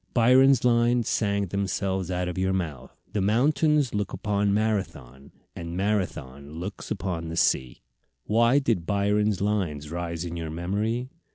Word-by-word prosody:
Byron's 130 +1 +5
lines 120 0 +3
sang 100 -2 0
themselves 95 -1 -2
out 90 -1 -1
of 90 - -4
your 95 0 +1
mouth: 80 -9 -4 0.2
"The 105 - 0
mountains 145 +6 +2
look 105 -1 -2
upon 100 -1 0
Marathon, 100 - -2 0.2
And 85 +1 -6
Marathon 75 -9 -2
looks 90 +6 -7
on 90 -5 -3
the 80 - -5
sea." 65 -6 +1 0.4
Why 115 +5 +3
did 115 -12 0
Byron's 105 0 +1
lines 85 -8 -1
rise 85 -1 -4
in 85 0 -5
your 80 -2 -4
memory? 105 - -2
100 Hz, 145 wpm, -26 LUFS, 85-110 Hz, 0.4 s, Byron's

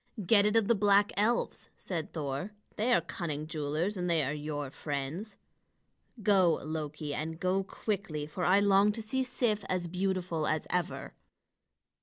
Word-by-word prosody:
"Get 205 +1 +5
it 210 - +1
of 225 -3 +4
the 235 - +5
black 205 -1 +4
elves," 225 +4 0
said 165 -4 -4
Thor; 145 +5 -3 0.2
"they 230 +4 +1
are - - +5
cunning 155 -4 -4
jewelers, 155 +6 -2
and 180 -1 -1
they 165 -3 +3
are 135 +2 -1
your 145 -2 -4
friends. 150 +8 -4 0.9
Go, 190 -5 +4
Loki, 155 -1 -4
and 160 +2 -3
go 185 +2 +1
quickly, 190 -7 -3
for 155 +4 -5
I 195 +3 +5
long 200 +1 +5
to 225 - -4
see 260 +5 -1
Sif 240 -5 0
as 180 -2 -1
beautiful 180 -3 -1
as 155 -1 0
ever." 180 0 -2
180 Hz, 160 wpm, -31 LUFS, 155-205 Hz, 0.9 s, Get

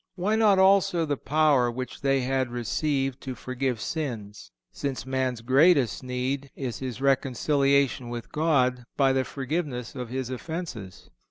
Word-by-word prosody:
Why 195 +4 0
not 215 -3 +4
also 190 -3 +4
the 145 -2 -1
power 145 -3 +2
which 125 +2 -6
they 135 -1 +2
had 130 0 0
received 135 +3 -1
to 130 -2 -5
forgive 130 0 -3
sins, 110 - -5 0.2
since 140 -3 -4
man's 130 -3 -1
greatest 135 - +4
need 130 +2 -3
is 130 -4 -4
his 130 -2 -5
reconciliation 135 -1 +2
with 120 -1 -6
God 130 -6 +1
by 135 -2 +4
the 130 0 +1
forgiveness 135 -3 -4
of 125 -3 -6
his 130 0 -3
offences? 130 - -6
135 Hz, 145 wpm, -26 LUFS, 125-145 Hz, 0.2 s, not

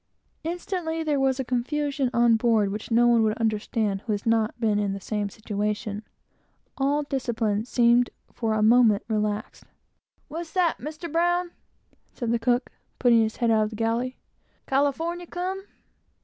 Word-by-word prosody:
Instantly 330 -1 -3
there 295 -3 0
was 270 0 +1
a 265 - -1
confusion 275 +2 -1
on 235 -1 +4
board 220 -3 +2
which 210 +2 -6
no 235 +1 +4
one 235 -1 +5
could 215 -1 +2
account 215 -2 -1
for - - -29
who - - 0
has 205 - -4
not 225 0 +1
been 215 -3 +2
in 200 -1 0
the 195 - -5
same 205 +1 -2
situation. 210 0 -3 0.7
All 285 +2 +1
discipline 230 -6 -1
seemed 240 0 +3 0.2
for 220 -2 -1
a 215 - +1
moment 220 -2 +5
relaxed. 210 -1 -2 0.6
"What's 325 +1 -7
that, 360 -3 +1
Mr. 310 +4 -7
Brown?" 350 +2 +1 0.6
said 235 -2 -2
the 235 - +1
cook, 245 +2 +1 0.3
putting 235 -2 +5
his 220 0 0
head 235 -2 +1
out 215 -1 +3
of - - -4
the 220 - -9
galley 230 +3 -1 0.5
"California 320 +6 0
come?" 375 +3 -4
235 Hz, 165 wpm, -25 LUFS, 220-290 Hz, 0.7 s, one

